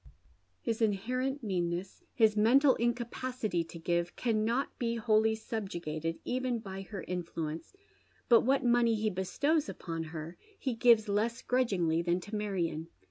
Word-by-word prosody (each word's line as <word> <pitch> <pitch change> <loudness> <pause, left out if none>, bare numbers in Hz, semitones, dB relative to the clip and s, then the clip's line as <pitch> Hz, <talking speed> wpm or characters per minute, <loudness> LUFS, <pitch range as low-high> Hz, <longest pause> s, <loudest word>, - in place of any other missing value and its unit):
His 225 0 -1
inherent 255 +6 0
meanneffi, 180 -2 -2
his 220 -3 +4
mental 255 +6 +5
incapacity 240 -4 -1
to 170 - -10
give, 170 +1 -1
carmot 230 +3 0
be 235 -1 0
wholly 220 -1 +3
sub 220 -2 -4
jugated 165 -1 -3
even 255 -1 -1
by 195 -3 -7
her 195 0 -7
influence, 165 - -5 0.5
but 235 -2 +7
what 265 +1 +2
money 235 -1 +4
he 215 0 0
bestows 285 - 0
upon 165 -2 -5
ber 165 +1 -7 0.2
he 260 - -2
gives 230 -2 +5
less 225 +4 0
grudgingly 190 -10 +1
than 175 +1 +1
to 205 +4 -7
Marion. 180 -6 -2
215 Hz, 140 wpm, -31 LUFS, 175-240 Hz, 0.5 s, but